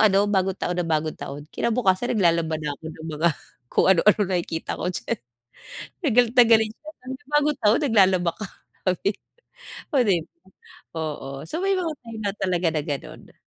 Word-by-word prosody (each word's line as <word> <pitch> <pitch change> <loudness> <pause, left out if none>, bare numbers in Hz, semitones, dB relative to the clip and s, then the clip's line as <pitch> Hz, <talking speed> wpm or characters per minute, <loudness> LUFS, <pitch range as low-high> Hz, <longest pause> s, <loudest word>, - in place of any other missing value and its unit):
ano 200 -2 +5
bagong 190 -2 +1
taon 180 - -2
na 170 - -2
bagong 155 -1 0
taon, 145 +1 -7
kinabukasan 235 -1 +1
naglalaba 170 -4 +2
na 150 -1 -3
ako - - -22
ng 160 0 -10
mga 160 +3 +2 0.4
kung - - +3
ano-ano 210 +5 +4
nakikita 175 -3 -2
ko - - -2
diyan, 180 - -3 1.0
galit 240 0 +4
na 245 - +10
galit 220 -1 +5
siya, 305 - -12
sabi 255 +1 -6
niya, 290 - -30
"Bagong 295 0 +1
taon, 215 +2 +4
naglalaba 190 -7 +4
ka?" 215 - -5 0.4
sabi 185 -1 0 0.2
niya, - - -24 0.8
oh, 275 - +5
di 190 -3 +4
ba? 165 - -23 0.6
Oo, 150 -3 -4 0.2
so - - -8
may 390 - +2
mga 360 -3 -1 0.2
time 230 -1 -8
na 200 - 0
talaga 180 -2 0
na 155 -1 -1
gano'n. 145 -3 -7
190 Hz, 180 wpm, -24 LUFS, 165-225 Hz, 1.0 s, na